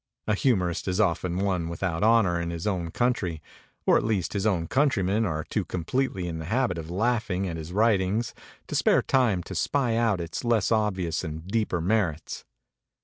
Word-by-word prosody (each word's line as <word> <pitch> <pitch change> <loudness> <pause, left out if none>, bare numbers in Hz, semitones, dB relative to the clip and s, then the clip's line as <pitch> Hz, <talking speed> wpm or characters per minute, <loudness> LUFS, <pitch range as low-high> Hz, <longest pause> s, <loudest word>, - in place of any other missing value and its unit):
A 105 - +1
humorist 100 -8 +1
is 90 +2 0
often 90 -2 0
without 85 -1 -2
honor 105 -6 +4
in 85 - -3
his 85 -1 -5
own 90 -5 -1
country, 100 -7 0 0.5
or - - +5
at - - 0
least 105 -5 -1
his 100 +1 0
own 90 -6 +1
countrymen 110 - +1
are 80 -3 -2
too - - -2
completely 95 +1 -2
in 80 -1 -4
the 80 - -6
habit 105 -2 0 0.5
< - - -23
ing 95 +1 -1
at 85 - -4
his 80 +1 -7
writings 105 +1 +1 0.3
to - - -8
spare - - +3
time 115 -9 +2
to 95 - -8
spy 120 - 0
out 115 -5 +2
its 85 -1 -5
less 115 -3 +2
obvious 95 -7 0
and 80 -1 -6
deeper 105 -4 0
nu 95 +6 +1 0.2
rits. 75 - -9
95 Hz, 185 wpm, -26 LUFS, 85-110 Hz, 0.5 s, or